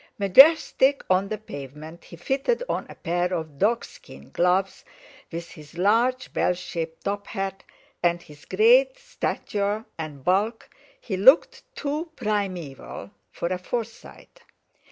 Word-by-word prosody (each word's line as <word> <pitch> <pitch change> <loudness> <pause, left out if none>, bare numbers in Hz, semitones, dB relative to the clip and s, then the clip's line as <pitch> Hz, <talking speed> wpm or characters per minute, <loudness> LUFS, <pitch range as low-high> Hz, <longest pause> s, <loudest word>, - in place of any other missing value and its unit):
Majestic 270 - +5
on 185 +2 +3
the 215 - -3
pavement 155 -3 -10
he - - -12
fitted 270 - -1
on - - -3
a - - -10
pair 175 +2 -1
of 160 -5 -4
dog 230 +3 +2
skin - - -15
gloves; 185 +2 +1 0.5
with 170 0 -6
his 150 +1 -14
large 235 +7 +1
bell 180 - +1
shaped 165 -2 -6
top 200 0 -3
hat, 195 -2 -4 0.4
and 175 0 +2
his 150 -1 -16
great - - +4
stature 215 - -3
and 150 -4 -7
bulk 205 - 0 0.3
he 195 -5 -4
looked 265 - +5
too 300 +4 -3
primeval 185 - -4 0.2
for 170 - -4
a 185 0 -2
Forsyte. 230 +4 -7
195 Hz, 135 wpm, -25 LUFS, 170-240 Hz, 0.5 s, Majestic